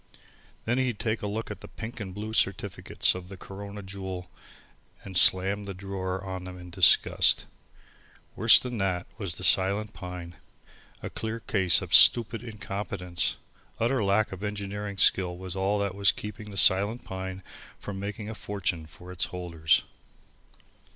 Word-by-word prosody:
Then 120 +3 +1
he'd 125 -4 0
take 110 +1 -2
a 105 - -3
look 110 +2 -4
at - - -8
the - - -10
pink 115 +1 -8
and 100 -3 -6
blue 105 +3 -6
certificates 100 -4 +1
of 90 -1 -8
the 95 - -9
Corona 100 +2 -9
Jewel 95 -2 -7 0.7
and 95 -2 -9
slam 95 +3 +5
the 100 -1 -6
drawer 95 -1 -4
on 95 -1 -6
them 90 0 -8
in 90 0 -11
disgust. 90 -3 +4 0.9
Worse 110 +2 +7
than 125 -3 -5
that 95 -2 -1
was 95 -7 -3
the - - -8
Silent 100 +3 +2
Pine, 90 -2 -8 0.7
a - - -5
clear 110 +1 -4
case 95 -5 +2
of - - -7
stupid 115 -1 +7
incompetence! 100 -5 -2 0.4
Utter 120 +1 +1
lack 100 +2 +2
of 95 +1 -8
engineering 105 0 -5
skill 90 -3 +2
was 95 -1 -7
all 95 +2 0
that 100 -2 -1
was 100 0 +3
keeping 105 0 -8
the 100 - -9
Silent 100 +6 +3
Pine 95 0 -6 0.3
from 100 -2 -7
making 105 +1 -5
a 110 - -5
fortune 90 -7 -3
for 90 +4 -13
its 90 -2 -1
holders. 85 -3 0
100 Hz, 160 wpm, -27 LUFS, 90-105 Hz, 0.9 s, Worse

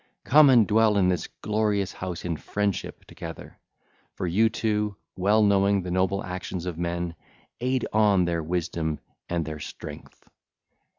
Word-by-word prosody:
Come 145 +1 +7
and 120 -4 +6
dwell 110 0 +3
in 90 -2 +4
this 90 -2 -1 0.2
glorious 105 -2 0
house 90 -2 -5
in 85 -2 -1
friendship 100 +5 -3
together; - - -9 0.6
for - - -3
you 105 +6 +3
two, 105 -2 -1 0.2
well 105 +4 +3
knowing 100 -1 +3
the 90 - -4
noble 95 +2 +1
actions 90 -1 -5
of 90 -2 -3
men, 85 0 -2 0.5
aid 130 +1 0
on 105 -4 +4
their 85 -1 -1
wisdom 80 -2 -2 0.3
and 85 -2 -1
their 75 0 -6
strength. - - -10
95 Hz, 145 wpm, -26 LUFS, 85-105 Hz, 0.6 s, Come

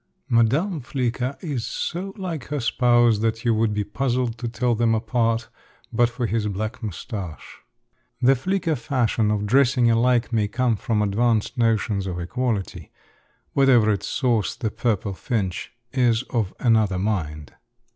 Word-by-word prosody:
Madame 140 - +2
Flicker 125 +1 -2
is 145 -9 -3
so 185 +3 -3
like 170 -9 -4
her 150 0 -3
spouse 120 -2 +3
that 115 +1 -1
you 115 - +4
would 110 0 +1
be 105 0 -1
puzzled 120 +2 -1
to 120 0 -5
tell 120 +1 0
them 115 0 +2
apart, 115 0 0 0.5
but 120 +1 +3
for 120 +1 -3
his 110 0 -1
black 105 +4 -4
mustache. 100 -4 -6 0.6
The 130 +2 +5
flicker 175 +3 -1
fashion 115 -3 0
of 105 -1 0
dressing 125 +1 +4
alike 120 +1 +2
may 105 -2 +2
come 120 +2 +1
from 105 +1 0
advanced 110 +2 +1
notions 110 -4 +1
of 90 -1 -4
equality; 100 - -3 0.6
whatever 125 -6 +5
its 100 - -2
source, 120 -6 0
the 110 -4 -3
purple 105 -4 -1
finch 95 -2 -3 0.2
is 125 -3 +2
of 110 -6 0
another 110 -5 +3
mind. 80 -7 -3
115 Hz, 145 wpm, -23 LUFS, 105-125 Hz, 0.6 s, The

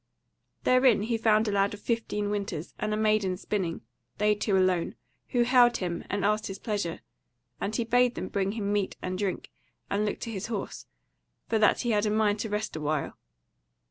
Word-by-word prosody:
Therein 255 -4 +4
he 230 +2 0
found 220 0 +3
a - - +1
lad 200 0 +1
of - - -14
fifteen 210 -3 -2
winters, 195 -6 -3
and 215 - -1
a 215 - 0
maiden 215 -4 +2
spinning, 185 -4 -2 0.4
they 210 0 +3
two 205 -1 +1
alone, 185 -2 +1 0.3
who 245 -2 +2
hailed 240 -1 +5
him 175 -2 -3
and 200 -1 -1
asked 215 +1 +1
his 195 - -6
pleasure, 200 -6 -3 0.6
and 215 - -2
he 235 - +1
bade 245 +1 +3
them 185 - -4
bring 195 0 -1
him 205 -2 -2
meat 205 -2 -1
and 185 0 -2
drink, 190 -1 -3 0.4
and 200 +1 +1
look 210 - -2
to 230 - -4
his 195 -2 -4
horse, 220 -4 -5 0.6
for 225 - +2
that 210 - +4
he 240 - 0
had 210 0 +2
a - - +2
mind 210 -1 +2
to 220 - -3
rest 210 -2 -2
a 155 - -4
while. 150 -1 -1
210 Hz, 200 wpm, -28 LUFS, 195-220 Hz, 0.6 s, hailed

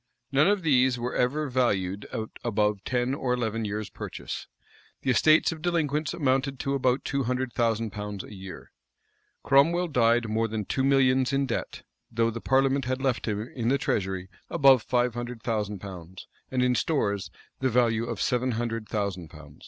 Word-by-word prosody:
[v*] 135 - -3
None 150 - +6
of 205 -2 +2
these 130 -4 +3
were 120 +1 -3
ever 145 +5 0
valued 100 -7 0
at 110 0 -4
above 105 -3 0
ten 125 +1 0
or 130 -3 0
eleven 115 -2 -2
years' 105 0 -4
purchase.[v] - - -6 0.6
The 130 - +2
estates 155 +7 +4
of 160 -1 -7
delinquents 155 -3 0
amounted 135 -2 0
to 135 - -1
above 130 -1 +1
two 140 -2 -1
hundred 125 0 -2
thousand 115 -2 0
pounds 105 -2 -5
a - - -11
year.[] 95 -1 -10 0.7
Cromwell 165 +6 +4
died 120 -3 +3
more 110 +1 0
than 110 -2 -3
two 130 - -1
millions 130 -1 +3
in 140 0 +1
debt;[v] 120 - -4 0.3
though 115 0 +1
the 115 +1 -6
parliament 135 0 +2
had 130 +1 -1
left 130 -3 -1
him 105 +1 -2
in 115 -3 -2
the 135 +3 +3
treasury 95 -6 -2 0.2
above 135 -3 +5
five 125 0 +1
hundred 120 -1 -6
thousand 105 -3 -1
pounds; 95 -2 -9 0.2
and 130 -1 +1
in 125 0 +3
stores, 105 -7 0 0.3
the 130 - +1
value 115 -2 +2
of - - -4
seven 125 0 +1
hundred 115 -1 -3
thousand 100 -5 -2
pounds. 75 -1 -14
120 Hz, 180 wpm, -27 LUFS, 110-135 Hz, 0.7 s, None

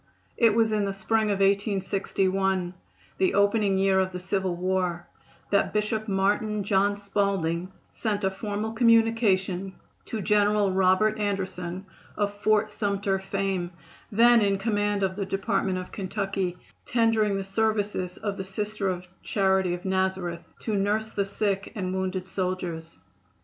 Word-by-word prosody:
It 230 -3 +4
was 225 -1 +3
in 210 -1 +1
the 195 0 -2
spring 220 +3 +1
of 200 -2 0
1861, 195 -2 +1 0.5
the 190 - +2
opening 200 -1 +3
year 190 0 +3
of 190 0 0
the 180 - -5
civil 185 0 -1
war, 180 -1 -1 0.5
that 200 -1 +2
Bishop 215 +1 -1
Martin 205 +2 +1
John 200 +1 +2
Spalding 195 -4 -1 0.2
sent 210 -2 -2
a 190 - +2
formal 205 +2 -3
communication 225 -5 +2 0.3
to 225 - -4
General 205 0 +3
Robert 190 +3 +3
Anderson, 190 -2 -3 0.3
of 205 -1 0
Fort 215 +1 +1
Sumter 200 -2 -1
fame, 195 -2 -2 0.4
then 235 +2 +6
in 200 -1 +2
command 205 -1 0
of 190 -1 0
the 200 0 -2
Department 195 -1 0
of 185 0 -6
Kentucky, 195 -2 -3 0.3
tendering 225 -3 +2
the 195 - -2
services 205 -3 -1
of 205 -2 -3
the 190 - -3
Sisters 195 -2 -3
of - - -25
Charity 190 -3 +1
of 180 +2 -11
Nazareth 190 -2 -1 0.2
to 220 - -2
nurse 210 +2 0
the 200 -2 -1
sick 200 0 -2
and 185 -3 -2
wounded 190 0 -2
soldiers. 180 -3 -3
195 Hz, 145 wpm, -26 LUFS, 190-210 Hz, 0.5 s, then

